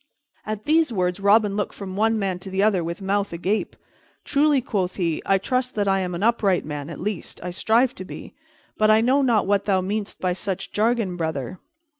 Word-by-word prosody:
At 215 0 -4
these 315 -2 +3
words 180 -2 -1
Robin 200 0 +4
looked 205 -1 -2
from 190 -2 -7
one 220 +2 +2
man 190 -3 -2
to 190 - -9
the 190 +1 0
other 200 -5 +2
with 170 +4 -5
mouth 200 +1 0
agape. 185 +5 -2 0.5
"Truly," 290 0 +3
quoth 195 -8 -2
he, 170 -4 -1
"I 195 - +4
trust 255 +5 -2
I 195 -2 +2
am 180 -2 -3
an 175 - -3
upright 215 -5 +2
man, 145 0 -5
at 165 - -8
least, 205 -1 -4
I 180 - -4
strive 230 +7 +2
to 185 - -8
be; 185 - -10 0.5
but 215 0 +4
I 215 +1 +6
know 260 +4 +3
not 235 -6 +2
what 200 0 +1
thou 195 -2 +2
meanest 200 +2 -3
by 185 -1 0
such 190 0 -4
jargon, 215 -4 0
brother. 160 0 -3
200 Hz, 205 wpm, -23 LUFS, 185-220 Hz, 0.5 s, I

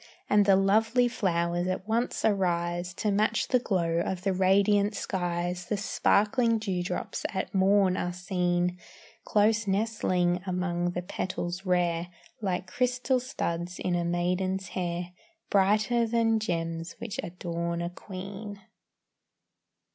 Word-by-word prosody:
And 205 -1 +4
the 195 - +7
lovely 220 +5 +3
flowers 175 -6 0
at 185 +2 -3
once 230 +2 0
arise 175 -3 0
To 210 - 0
match 210 +2 +1
the 250 - +4
glow 170 -7 0
of 185 +1 -2
the 195 -1 +1
radiant 200 +2 +3
skies, 175 -1 -2
The 210 - -1
sparkling 225 +4 +2
dewdrops 190 -4 -3
at - - -3
morn 195 -1 +4
are 175 - -1
seen, 180 -1 -1 0.5
Close 215 +1 +2
nestling 190 -4 +1
among 175 -1 -1
the 180 - -3
petals 180 +1 -4
rare, 175 -1 +1 0.3
Like 185 -3 -1
crystal 250 +5 0
studs 180 -9 -3
in 180 - -1
a 175 0 +1
maiden's 180 +2 -1
hair, 175 -1 -3 0.4
Brighter 215 +4 +3
then 225 -1 +2
gems 165 -4 -3
which 230 -4 -6
adorn 170 -1 -3
a 170 - -3
queen. 200 +2 -8
185 Hz, 125 wpm, -28 LUFS, 175-210 Hz, 0.5 s, the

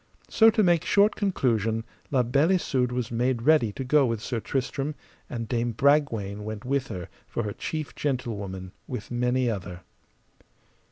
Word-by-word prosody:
So, 225 0 +7
to 215 -1 +3
make 175 -3 +3
short 205 +1 +4
conclusion, 115 - 0 0.3
La 130 -3 +2
Beale 140 +9 +3
Isoud 130 -9 +1
was 125 -2 -2
made 120 0 0
ready 150 -6 +4
to 135 - -4
go 140 +1 +4
with 115 -2 -1
Sir 120 +1 -3
Tristram, 135 +4 -2 0.3
and 115 -2 -4
Dame 120 0 -1
Bragwaine 115 -7 +1
went 110 +1 -6
with 135 0 0
her 90 -7 -6 0.2
for 120 - -3
her 105 -1 -3
chief 155 +5 -4
gentlewoman, 100 -9 -3 0.2
with 125 -3 -6
many 125 +1 +1
other. 90 -5 -4
125 Hz, 160 wpm, -26 LUFS, 110-140 Hz, 0.3 s, So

